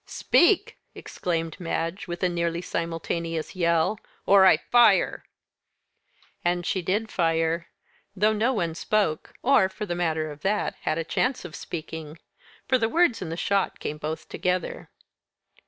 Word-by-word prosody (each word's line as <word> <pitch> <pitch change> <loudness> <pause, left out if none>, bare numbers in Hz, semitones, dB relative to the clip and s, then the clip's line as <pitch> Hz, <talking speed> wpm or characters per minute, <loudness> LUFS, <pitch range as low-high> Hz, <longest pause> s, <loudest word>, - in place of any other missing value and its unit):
"Speak!" 345 +1 +2 0.2
exclaimed 165 -1 -3
Madge, 170 +2 -3
with 175 +1 -5
a - - +5
nearly 170 -1 -1
simultaneous 165 -1 -3
yell, 170 +3 +1 0.3
"or 195 -1 +7
I 170 - +6
fire!" 240 +8 +3 1.2
And 175 0 0
she 185 - 0
did 205 +6 -1
fire 165 0 0 0.5
though 210 +3 +3
no 220 +4 +1
one 175 -9 -1
spoke; 170 -2 -1
or, 240 -7 +4
for 210 +2 -6
the 175 - -3
matter 160 -3 -1
of 145 0 -11
that, 210 +4 0
had 155 - -1
a 165 - -1
chance 255 - -1
of 160 - -8
speaking; 160 -1 -7 0.5
for 255 - +3
the 225 -1 +1
words 335 -6 +2
and 170 -3 -4
the 165 - -4
shot 200 +1 0
came 150 +1 -5
both 155 +1 -5
together. 180 -1 -2
175 Hz, 150 wpm, -26 LUFS, 165-200 Hz, 1.2 s, or